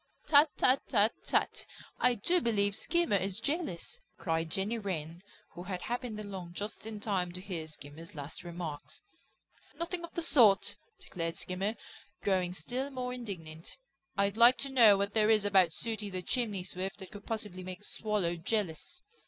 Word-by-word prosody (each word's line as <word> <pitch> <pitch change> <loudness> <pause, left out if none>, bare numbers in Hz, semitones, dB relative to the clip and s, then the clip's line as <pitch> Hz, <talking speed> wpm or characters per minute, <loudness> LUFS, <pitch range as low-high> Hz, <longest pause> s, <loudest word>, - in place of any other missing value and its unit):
"Tut, 295 +1 +7
tut, 260 +2 +5
tut, 215 -1 +5
tut! - - +1 0.4
I 250 -1 +4
do 345 - +2
believe 205 -5 +1
Skimmer 340 - +1
is 195 +1 -2
jealous," 285 - -2 0.2
cried 165 0 -1
Jenny 205 +7 -1
Wren, 170 -4 -4 0.3
who 175 - -9
had 180 -1 -5
happened 240 -2 -3
along 190 -4 -7
just 210 +3 -5
in 215 -2 -5
time 190 -4 -1
to 180 - -3
hear 180 -4 -5
Skimmer's 155 +2 -10
last 145 +3 -7
remarks. 170 -4 -6 0.7
"Nothing 345 +1 -3
of 340 - -7
the 340 - -1
sort," 210 -9 +5 0.2
declared 165 -2 -4
Skimmer, 195 +4 -1 0.5
growing 185 -3 +1
still 245 - -3
more 250 -2 -4
indignant. 170 -10 -7 0.4
"I'd 200 +1 +2
like 240 +2 +8
to - - -4
know 230 -6 +7
what 200 +1 -1
there 215 -1 +3
is 215 -2 +4
about 190 -4 +5
Sooty 215 +3 -3
the 185 -1 -3
Chimney 210 -4 -1
Swift 190 +2 -4
that 190 -2 -9
could 205 -1 -11
possibly 210 -5 -4
make 185 +1 -7
a - - -17
Swallow 210 -6 -1
jealous." 205 - -2
200 Hz, 170 wpm, -32 LUFS, 180-230 Hz, 0.7 s, like